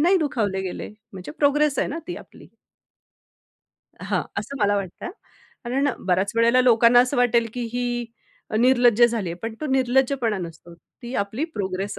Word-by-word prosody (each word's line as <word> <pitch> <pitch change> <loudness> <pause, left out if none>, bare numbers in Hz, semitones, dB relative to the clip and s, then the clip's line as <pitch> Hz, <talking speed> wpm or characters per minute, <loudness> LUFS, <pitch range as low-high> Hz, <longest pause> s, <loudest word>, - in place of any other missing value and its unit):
नाही 355 +5 +4
दुखावले 215 - -1
गेले 185 -2 -5 0.2
म्हणजे 185 +7 -8
प्रोग्रेस 290 -1 +2
आहे - - +1
ना, 330 - -4
ती 355 - -4
आपली. - - -14 1.5
हां, - - -1 0.2
असं 280 - -6
मला 205 0 +3
वाटतं 190 -3 -5
हां. - - -5 0.5
कारण 270 +4 0 0.2
बऱ्याच 190 +2 +1
वेळेला 235 +2 +4
लोकांना 245 -1 +6
असं 250 +3 0
वाटेल, 240 -1 +3
की 250 - -4
ही 240 -1 -2 0.4
अ, - - -1
निर्लज्ज 240 -1 +4
झालीये. 220 -8 0
पण 225 0 -4
तो 305 - -3
निर्लज्जपणा 260 -3 +1
नसतो. 170 -1 -9 0.3
ती 240 +2 -7
आपली 220 +9 -4
प्रोग्रेस 195 +1 -3
240 Hz, 160 wpm, -23 LUFS, 205-260 Hz, 1.5 s, लोकांना